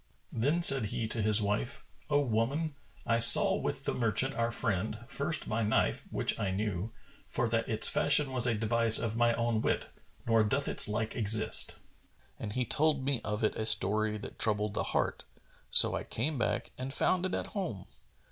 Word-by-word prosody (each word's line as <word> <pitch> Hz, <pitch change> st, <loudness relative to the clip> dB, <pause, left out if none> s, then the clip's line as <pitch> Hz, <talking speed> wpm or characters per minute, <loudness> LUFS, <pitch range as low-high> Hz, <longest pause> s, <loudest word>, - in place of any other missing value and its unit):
Then 145 Hz, +9 st, 0 dB
said 135 Hz, -8 st, +6 dB
he 110 Hz, +2 st, -3 dB
to 115 Hz, -, -3 dB
his 105 Hz, 0 st, +3 dB
wife, 100 Hz, -11 st, -3 dB, 0.3 s
"O 145 Hz, -1 st, +3 dB
woman, 140 Hz, +6 st, -1 dB, 0.3 s
I 115 Hz, 0 st, +1 dB
saw 115 Hz, -, +6 dB
with -, -, -4 dB
the -, -, -1 dB
merchant 125 Hz, +3 st, -1 dB
our 115 Hz, 0 st, -1 dB
friend, 110 Hz, -3 st, -2 dB
first -, -, -2 dB
my 110 Hz, +2 st, -1 dB
knife, 110 Hz, 0 st, 0 dB
which -, -, -2 dB
I 100 Hz, -, -1 dB
knew, 100 Hz, +1 st, -3 dB, 0.4 s
for 120 Hz, -, -2 dB
that 115 Hz, 0 st, -1 dB
its 110 Hz, -1 st, +1 dB
fashion 145 Hz, -1 st, +2 dB
was 125 Hz, -1 st, -1 dB
a 115 Hz, -, +1 dB
device 115 Hz, +1 st, +2 dB
of 115 Hz, -1 st, -2 dB
my 120 Hz, 0 st, +2 dB
own 115 Hz, -1 st, -1 dB
wit, -, -, -1 dB, 0.4 s
nor 115 Hz, -1 st, +3 dB
doth 140 Hz, +7 st, -1 dB
its -, -, 0 dB
like 110 Hz, +1 st, -3 dB
exist; 110 Hz, -1 st, 0 dB, 0.6 s
and 105 Hz, -2 st, -5 dB
he 125 Hz, +1 st, -1 dB
told 145 Hz, 0 st, +1 dB
me 135 Hz, -3 st, -1 dB
of 105 Hz, +1 st, -3 dB
it 110 Hz, -, +1 dB
a 110 Hz, -, -3 dB
story 105 Hz, 0 st, +3 dB
that 105 Hz, -, -10 dB
troubled 105 Hz, -1 st, +1 dB
the -, -, -2 dB
heart: -, -, -1 dB, 0.5 s
so -, -, +7 dB
I -, -, -3 dB
came 135 Hz, +4 st, -3 dB
back -, -, -2 dB
and 130 Hz, +1 st, -5 dB
found 185 Hz, +6 st, 0 dB
it 185 Hz, -, -3 dB
at -, -, -3 dB
home. 175 Hz, -, -4 dB
115 Hz, 190 wpm, -30 LUFS, 105-130 Hz, 0.6 s, so